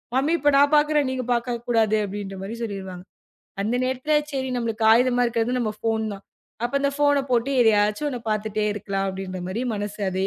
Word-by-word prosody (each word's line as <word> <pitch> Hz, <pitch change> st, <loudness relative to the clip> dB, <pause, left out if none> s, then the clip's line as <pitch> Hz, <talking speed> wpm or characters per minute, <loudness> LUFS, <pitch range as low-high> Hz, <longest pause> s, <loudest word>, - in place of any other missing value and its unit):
Mummy 280 Hz, +5 st, +2 dB
இப்ப 290 Hz, +1 st, +3 dB
நான் 285 Hz, +2 st, +4 dB
பாக்குறேன். 295 Hz, -1 st, +3 dB
நீங்கப் 255 Hz, -2 st, -4 dB
பாக்கக்கூடாது 235 Hz, -2 st, 0 dB
அப்படின்ற 200 Hz, 0 st, -6 dB
மாதிரி 210 Hz, +4 st, -6 dB
சொல்லிருவாங்க. 190 Hz, -4 st, -6 dB, 0.6 s
அந்த 225 Hz, +4 st, -1 dB
நேரத்துல 260 Hz, +4 st, 0 dB, 0.2 s
சரி 265 Hz, -1 st, -2 dB
நமக்கு 225 Hz, -2 st, -1 dB
ஆயுதமா 245 Hz, +1 st, +3 dB
இருக்குறது 235 Hz, +1 st, 0 dB
நம்ம 215 Hz, -3 st, -1 dB
போன் 220 Hz, -1 st, 0 dB
தான். 195 Hz, -, -13 dB, 0.4 s
அப்ப 240 Hz, -, -2 dB
அந்தப் 280 Hz, 0 st, -1 dB
போனை 285 Hz, -1 st, +4 dB
போட்டு 245 Hz, +3 st, +1 dB
ஏதையாச்சும் 210 Hz, +5 st, +2 dB
ஒன்னு 250 Hz, -3 st, -5 dB
பாத்துட்டே 215 Hz, 0 st, -1 dB
இருக்கலாம் 195 Hz, -1 st, -2 dB
அப்படின்ற 190 Hz, -1 st, -6 dB
மாதிரி 220 Hz, +7 st, -3 dB
மனசு 205 Hz, +1 st, -5 dB
அதே- 190 Hz, +1 st, -1 dB
230 Hz, 175 wpm, -24 LUFS, 205-260 Hz, 0.6 s, நான்